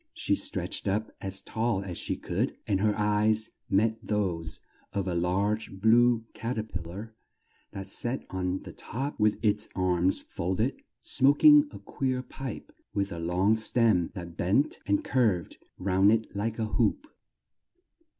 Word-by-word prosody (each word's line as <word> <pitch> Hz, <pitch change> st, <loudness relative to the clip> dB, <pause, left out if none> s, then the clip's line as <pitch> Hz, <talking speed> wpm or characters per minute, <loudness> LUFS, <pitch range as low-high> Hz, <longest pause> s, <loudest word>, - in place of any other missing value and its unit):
She -, -, 0 dB
stretched -, -, 0 dB
up 105 Hz, +3 st, -1 dB
as 95 Hz, 0 st, 0 dB
tall 110 Hz, -3 st, -1 dB
as 90 Hz, -3 st, -6 dB
she -, -, -3 dB
could, -, -, -2 dB
and 100 Hz, -2 st, +1 dB
her 105 Hz, -1 st, +2 dB
eyes 105 Hz, +1 st, +2 dB, 0.2 s
met 110 Hz, +3 st, +2 dB
those 90 Hz, -6 st, -2 dB, 0.3 s
of 100 Hz, -1 st, -1 dB
a 90 Hz, -, -1 dB
large 95 Hz, +4 st, -1 dB
blue 115 Hz, +2 st, +4 dB
cat 115 Hz, +2 st, -4 dB
er 110 Hz, -, 0 dB
pil 90 Hz, -5 st, -6 dB
lar 105 Hz, +6 st, -8 dB, 0.6 s
that 95 Hz, 0 st, -7 dB
sat 120 Hz, +6 st, -3 dB
on 95 Hz, 0 st, -2 dB
the -, -, -9 dB
top 135 Hz, +5 st, -5 dB
with 105 Hz, 0 st, +3 dB
its 105 Hz, 0 st, +1 dB
arms 90 Hz, 0 st, +1 dB
fold 90 Hz, +2 st, -4 dB
ed, 125 Hz, +5 st, 0 dB, 0.3 s
smok 140 Hz, +2 st, +3 dB
ing 295 Hz, -1 st, +8 dB
a -, -, -10 dB
queer 130 Hz, -2 st, -2 dB
pipe 130 Hz, -2 st, -7 dB, 0.2 s
with 100 Hz, 0 st, 0 dB
a 85 Hz, -, -5 dB
long 90 Hz, +6 st, +2 dB
stem 110 Hz, -5 st, +3 dB
that 85 Hz, -3 st, -7 dB
bent 100 Hz, -, +1 dB
and 100 Hz, 0 st, +2 dB
curved 110 Hz, -10 st, 0 dB, 0.2 s
round 95 Hz, +2 st, +3 dB
it 110 Hz, -2 st, 0 dB
like 110 Hz, +2 st, -2 dB
a 110 Hz, -, -1 dB
hoop. 280 Hz, -, 0 dB
105 Hz, 160 wpm, -28 LUFS, 95-115 Hz, 0.6 s, ing